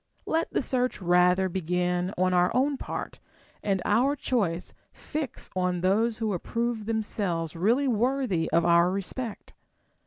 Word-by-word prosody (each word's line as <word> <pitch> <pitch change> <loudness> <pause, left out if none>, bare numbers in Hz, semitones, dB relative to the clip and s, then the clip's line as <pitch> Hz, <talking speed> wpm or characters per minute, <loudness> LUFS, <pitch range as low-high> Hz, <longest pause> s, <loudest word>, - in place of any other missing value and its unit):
Let 325 +1 0
the - - 0
search 250 0 0
rather 180 +1 +3
begin 180 0 -1
on 185 0 +2
our 180 0 +4
own 275 +3 +2
part, - - -6 0.4
and 195 -3 0
our 250 +7 +3
choice 195 - -1 0.2
fix 300 -5 -5
on 180 -1 0
those 215 +5 +2
who 220 -2 -1
approve 230 +4 -2
themselves 200 -7 -2
really 235 +11 +2
Λvorthy 240 -6 +1
of 165 +1 +3
our 170 +1 +5
respect. 200 +4 -5
195 Hz, 135 wpm, -27 LUFS, 180-240 Hz, 0.4 s, our